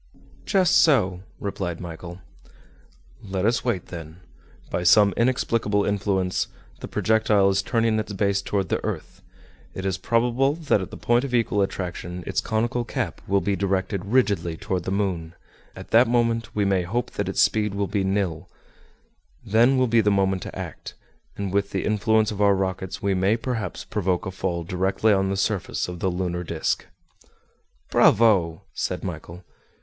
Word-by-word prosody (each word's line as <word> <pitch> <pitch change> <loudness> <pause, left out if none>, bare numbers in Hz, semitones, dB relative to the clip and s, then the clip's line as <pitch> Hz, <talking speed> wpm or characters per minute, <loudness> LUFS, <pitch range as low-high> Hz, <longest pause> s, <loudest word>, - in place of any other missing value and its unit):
"Just 185 -4 +4
so," 95 - +3 0.2
replied 95 -4 -4
Michel. 85 +1 -8 1.0
"Let 95 -2 -2
us 115 +2 +1
wait, 115 -8 -2
then. 85 -1 -9 0.5
By 90 - -1
some 100 +3 +5
inexplicable 115 -4 +1
influence, 100 -2 0 0.3
the - - -7
projectile 110 -3 +2
is 95 0 +1
turning 115 +1 +1
its 110 - -4
base 100 0 +1
toward 100 -4 -2
the - - -1
earth. - - -5 0.5
It 95 - -5
is 95 -1 -1
probable 125 +4 +1
that 155 -11 +1
at 95 - -6
the - - -9
point 120 +1 +2
of 130 -3 -2
equal 110 -3 +1
attraction, 90 -2 -4
its - - -1
conical 120 +3 -1
cap 120 - -4
will 100 0 +2
be 100 +2 0
directed 95 0 -1
rigidly 100 -7 +1
toward 95 -2 -3
the 95 - -2
moon; 90 -5 -2 0.4
at - - -11
that 120 +3 +6
moment 115 -1 0
we 105 -1 +1
may 95 -2 +2
hope 110 +8 -2
that - - -3
its - - +1
speed 105 -2 +1
will 100 0 0
be 100 0 -1
nil; 95 -3 -1 1.0
then 120 +6 +4
will 130 - +3
be 115 -1 +3
the 105 - +2
moment 95 -2 +1
to - - -7
act, - - -7 0.4
and 100 -2 -3
with 100 0 +1
the 95 - -2
influence 110 +1 +2
of 105 -1 -4
our 100 -1 +5
rockets 95 0 -3
we 100 -1 +2
may 95 +4 +2
perhaps 115 -3 -4
provoke 95 -4 -1
a 95 - -3
fall 85 -2 -3
directly 95 +5 +1
on 95 -1 +1
the 95 - -1
surface 100 -1 -1
of 90 -1 -7
the 95 - 0
lunar 90 -1 -2
disc." 80 -2 -2 1.0
"Bravo!" 95 -8 +4
said - - -3
Michel. 90 +2 -7
100 Hz, 170 wpm, -24 LUFS, 95-110 Hz, 1.0 s, that